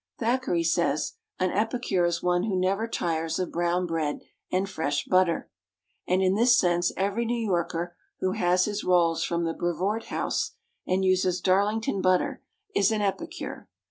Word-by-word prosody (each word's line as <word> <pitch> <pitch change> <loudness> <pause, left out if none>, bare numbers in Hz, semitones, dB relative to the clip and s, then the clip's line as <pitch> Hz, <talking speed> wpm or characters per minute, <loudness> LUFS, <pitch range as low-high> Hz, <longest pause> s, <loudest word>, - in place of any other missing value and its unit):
Thackeray 235 -7 0
says, 165 -3 +1 0.2
an 185 -1 +1
epicure 215 -3 0
is 170 0 -1
one 180 0 +2
who 195 -4 0
never 195 +5 +1
tires 165 -6 -1
of 185 -2 -2
brown 175 +1 0
bread 160 -3 -2 0.3
and 190 +2 +1
fresh 160 -6 -2
butter, 185 -2 +2 0.6
and 185 +1 +2
in 185 0 +3
this 240 +4 +5
sense 175 -4 +2
every 200 +4 0
New 235 +1 -1
Yorker 175 -5 -1 0.2
who 185 - 0
has 180 0 +2
his 210 0 -3
rolls 170 -2 +3
from 170 0 -1
the 165 0 -1
Brevoort 185 +7 -1
House, - - -2 0.3
and 190 +1 +1
uses 185 -1 +2
Darlington 200 +2 +1
butter, 185 -1 +1 0.3
is 400 - +3
an 215 -1 0
epicure. 325 - -4
185 Hz, 160 wpm, -27 LUFS, 175-205 Hz, 0.6 s, this